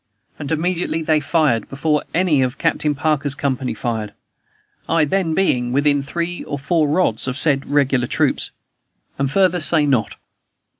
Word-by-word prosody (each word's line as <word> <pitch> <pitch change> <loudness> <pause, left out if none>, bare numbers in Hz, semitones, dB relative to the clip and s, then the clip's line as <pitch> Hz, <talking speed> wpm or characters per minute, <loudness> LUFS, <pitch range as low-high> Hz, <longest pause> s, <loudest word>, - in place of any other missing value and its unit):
and 145 - -5
immediately 165 0 -1
they 155 -1 +2
fired, 145 -7 +1
before 150 +2 0
any 165 -6 +2
of 130 +1 -1
Captain 150 -1 0
Parker's 145 -1 0
company 135 -3 -2
fired, 110 -4 -3 0.8
I 165 -2 +3
then 165 0 0
being 125 -11 +1
within 145 +1 +2
three 170 +5 -4
or 145 - -4
four 155 +3 +1
rods 145 -7 +1
of 130 +1 -2
said 140 -2 +3
regular 135 -4 +1
troops. - - 0 0.7
And 135 -1 +1
further 180 +2 +2
say 155 -1 +2
not. 130 -7 0
145 Hz, 150 wpm, -19 LUFS, 135-165 Hz, 0.8 s, I